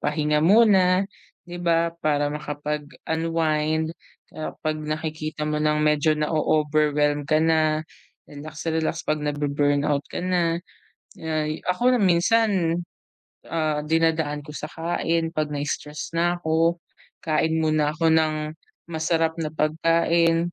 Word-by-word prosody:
pahinga 150 0 +1
muna, 190 0 +5 0.4
di 175 0 -8
ba? 170 -1 +2
Para 145 -1 +1
makapag-unwind, 155 +2 -2 0.4
ah, 155 - -6
'pag 155 0 -1
nakikita 155 0 -4
mo 150 0 -1
nang 150 0 +2
medyo 150 +1 +3
na-o-overwhelmed 150 -1 +1
ka 155 - +3
na, 155 -1 +2 0.4
relax-relax 155 +2 -4
'pag 155 0 -1
nabu-burnout 145 0 0
ka 180 - -5
na. 175 -2 +1 0.6
Ay, 155 -1 -3
ako, 245 +8 +2
minsan, 180 -1 +2 0.7
ah, 155 -2 0
dinadaan 160 -1 0
ko 150 - -10
sa 150 0 -6
kain, 165 0 -1
'pag 155 -2 -1
na-stress 150 +2 -4
na 175 +1 +1
ako, 165 0 +1 0.5
kain 160 0 +1
muna 155 -1 +2
ako 165 0 +2
ng 160 -1 +3 0.6
masarap 160 0 +1
na 155 - -1
pagkain, 165 +2 +2
155 Hz, 115 wpm, -24 LUFS, 150-165 Hz, 0.7 s, muna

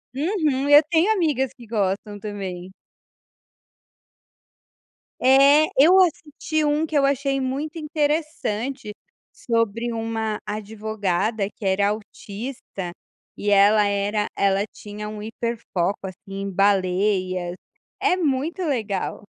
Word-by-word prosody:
Uhum, 300 -3 0
eu 290 +1 +9
tenho 345 +5 +3
amigas 295 - 0
que 240 -3 -15
gostam 205 -1 -2
também. 190 -3 -6 2.5
É! 275 +4 +6
Eu 340 +8 +7
assisti 315 -2 0
um, 300 +1 +1
que 315 -1 -1
eu 275 - +4
achei 275 0 0
muito 280 +5 -3
interessante 290 -7 -2 0.4
sobre 230 0 -1
uma 225 -1 -2
advogada 210 -1 -2
que 210 - -10
era 195 +1 +2
autista 210 -2 -6 0.5
e 205 - -2
ela 205 +1 +5
era 205 +1 0
ela 195 0 +2
tinha 210 0 -8
um 210 0 -7
hiperfoco 215 -4 -2
assim, 195 +1 -8
em 200 - -3
baleias, 185 -2 +1 0.5
é - - +3
muito 325 +2 -1
legal! 215 - -2
220 Hz, 110 wpm, -23 LUFS, 200-280 Hz, 2.5 s, eu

